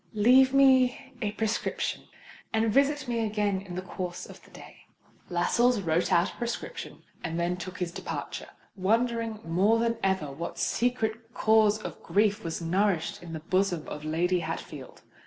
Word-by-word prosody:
Leave 255 +5 +6
me 265 -1 +4
a 210 -2 0
prescription, 220 0 -2 0.5
and 220 -1 +1
visit 280 0 +2
me 235 -1 -1
again 205 -3 0
in 185 -3 -8
the 185 - -4
course 180 -1 -5
of - - -13
the - - -19
day." - - -13 0.5
Lascelles 235 +7 +2
wrote 170 -2 0
out 170 +3 +3
a - - -18
prescription, 240 - -5 0.2
and 165 0 -3
then 175 +1 0
took 185 +1 -7
his 180 -2 -2
departure, - - -6 0.3
wondering 225 +2 0
more 190 +7 +3
than 230 0 0
ever 190 -7 0
what 165 +5 -6
secret 230 -1 -1
cause 215 -1 +4
of - - -8
grief 210 +1 +1
was 165 +1 -4
nourished 180 0 0
in 170 -2 -9
the 160 - -5
bosom 185 -1 0
of 150 - -6
Lady 175 +4 +1
Hatfield. - - -7
205 Hz, 160 wpm, -28 LUFS, 175-230 Hz, 0.5 s, Leave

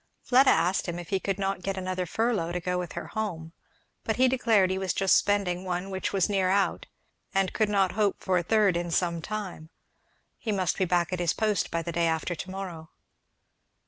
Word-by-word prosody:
Fleda 260 +2 +5
asked 175 +4 +2
him 175 0 -3
if 175 -1 -8
he 195 - +1
could 195 0 -2
not 195 -2 -2
get 195 +1 -3
another 185 -1 -2
furlough 220 -4 0
to 180 - -1
go 180 +1 -2
with 175 -2 -5
her - - -6
home, 170 -7 -4 0.5
but 220 - -1
he 255 +1 +4
declared 225 -7 +3
he 190 - -1
was 190 -1 -1
just 195 -1 +4
spending 195 -3 +1
one 180 +1 -3
which 190 0 -2
was 195 -3 +2
near 195 -3 +1
out; 195 +1 +1 0.5
and 195 -1 +2
he - - -20
could 215 -2 +1
not 195 -3 +2
hope 205 -1 0
for 185 -2 +1
a - - -1
third 205 0 +3
in 175 0 -2
some 170 -1 0
time; 195 -6 -6 0.7
he 220 - -2
must 185 -4 0
be 190 - +3
back 175 0 +1
at 180 - -2
his 170 -2 +1
post 210 -3 0
by 165 0 -2
the 170 - -4
day 170 0 +1
after 160 +2 -1
to 175 +3 -7
morrow. 180 -4 -7
185 Hz, 220 wpm, -27 LUFS, 175-200 Hz, 0.7 s, Fleda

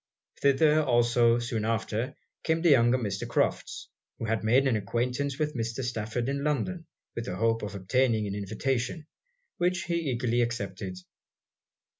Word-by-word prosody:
Thither 150 +3 +4
also, 120 -3 +3
soon 120 -2 -2
after, 115 +3 -1 0.3
came 160 +1 0
the 170 - +6
younger 120 -2 +5
Mr. 100 -5 -3
Crofts, - - -1 0.3
who - - -4
had 110 0 -1
made 125 +5 +4
an 130 -4 +2
acquaintance 125 +6 -1
with 150 -1 -1
Mr. 115 0 -3
Stafford 115 0 -2
in 140 +1 -2
London 165 +3 -1 0.3
with 115 - -4
the - - -4
hope 115 0 +1
of 105 -1 -5
obtaining 110 +3 +1
an 100 - -3
invitation, 125 - -2 0.5
which 180 +1 +1
he 170 -3 -1
eagerly 120 -1 +1
accepted. 100 -6 -3
120 Hz, 150 wpm, -28 LUFS, 110-140 Hz, 0.5 s, the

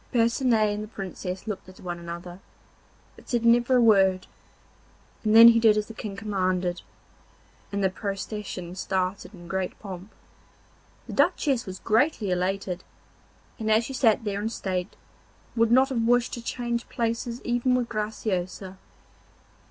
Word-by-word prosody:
Percinet 230 -3 +2
and 210 +1 -4
the - - -7
Princess 190 -2 -6
looked 200 -3 -6
at 185 - -15
one 175 -1 -5
another, 170 +1 -8 0.8
but - - -17
said 235 -2 0
never 240 +2 +4
a 250 - +5
word, 195 -4 +4 1.0
and 215 0 +2
then 230 +1 +11
he 230 0 +5
did 220 -2 +5
as 210 - 0
the 225 - -10
King 210 -2 -6
commanded, 185 -4 -1 0.9
and 200 -1 -1
the 190 - +3
procession 195 -2 -5
started 185 +1 -2
in 175 -4 -13
great 190 +1 -3
pomp. 195 0 -9 0.9
The - - -8
Duchess 265 -7 +1
was 190 0 -6
greatly 225 -2 +1
elated, 185 0 -2 0.8
and 220 -1 -2
as 220 +2 +4
she 270 - -6
sat 230 -4 +3
there 205 -1 -2
in 220 - -1
state 185 -4 -3 0.6
would 230 -1 +3
not 260 +3 +5
have 250 -4 -1
wished 240 +1 +2
to 240 - -4
change 240 0 -3
places 235 +1 -2
even 245 +1 +1
with 245 -2 0
Graciosa. 195 -4 -3
210 Hz, 150 wpm, -26 LUFS, 185-230 Hz, 1.0 s, then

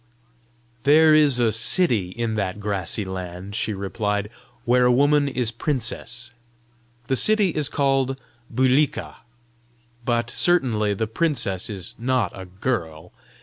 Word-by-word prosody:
"There 155 +4 +5
is 145 -5 +4
a 115 -2 +3
city 115 - +2
in 115 +3 -3
that 100 -2 -3
grassy 100 0 -2
land," 95 +1 -7
she 110 0 -2
replied, 105 +1 -3 0.3
"where 125 +1 +3
a 125 - +4
woman 145 +3 +3
is 125 -4 -1
princess. 120 -1 -3 0.7
The 130 - 0
city 215 - +3
is 150 -4 -1
called 135 -2 0 0.3
Bulika. 130 +4 +1 0.9
But 120 0 -1
certainly 115 - +2
the 110 - -1
princess 110 - -1
is 95 -4 -7
not 125 -5 0
a 95 - -9
girl! 90 -5 -4
120 Hz, 125 wpm, -23 LUFS, 100-135 Hz, 0.9 s, There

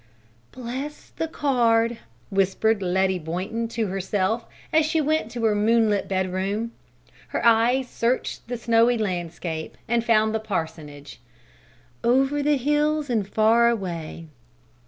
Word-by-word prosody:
"Bless 260 +4 -7
the 325 - -3
card!" 235 -6 +1 0.3
whispered 195 +3 +1
Letty 190 0 +1
Boynton 185 +8 -3
to 225 -1 -2
herself 195 +3 -1 0.3
as 315 0 +5
she 320 +1 0
went 310 -5 0
to 235 0 -5
her 220 -1 +3
moonlit 210 -1 +2
bedroom. 190 +4 -1 0.6
Her - - -3
eyes 235 +3 +4
searched 240 0 -2
the 245 0 -3
snowy 230 +1 +3
landscape 175 -5 -4
and 235 0 +1
found 220 -2 +3
the 220 - 0
parsonage, 160 -8 -5 0.8
"over 270 +4 +2
the 295 0 +2
hills 295 +1 +1
and 215 -5 0
far 225 +2 +4
away." 170 -7 -4
225 Hz, 125 wpm, -24 LUFS, 190-245 Hz, 0.8 s, as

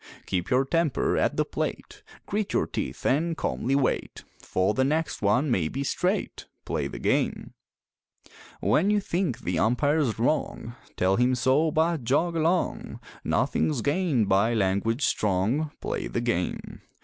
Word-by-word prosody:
Keep 90 -2 -2
your 130 +2 +3
temper 165 0 +1
at - - +1
the - - +2
plate, - - -5 0.2
Grit 210 0 -2
your - - +2
teeth - - -5
and 160 +5 +1
calmly 135 +3 -1
wait, 140 -2 -1 0.2
For 95 +3 0
the 130 - +1
next 155 +4 -1
one 125 +8 +2
may 90 -8 +1
be 135 - -3
straight 180 +8 -2 0.2
Play - - -2
the - - -7
game! - - -1 1.1
When 200 - +3
you 210 0 +3
think 175 - -2
the 85 -2 -1
umpire's 135 +1 +1
wrong, 120 -1 -1 0.2
Tell 95 +1 +2
him 125 +1 +3
so, 130 +6 +2
but 160 -1 +1
jog 155 +8 +1
along; 165 +3 0 0.2
Nothing's 145 -7 0
gained 145 - +1
by 100 +5 +3
language 110 +5 +1
strong 105 +10 0
Play - - -3
the - - -2
game! 115 -7 -3
130 Hz, 150 wpm, -26 LUFS, 110-160 Hz, 1.1 s, your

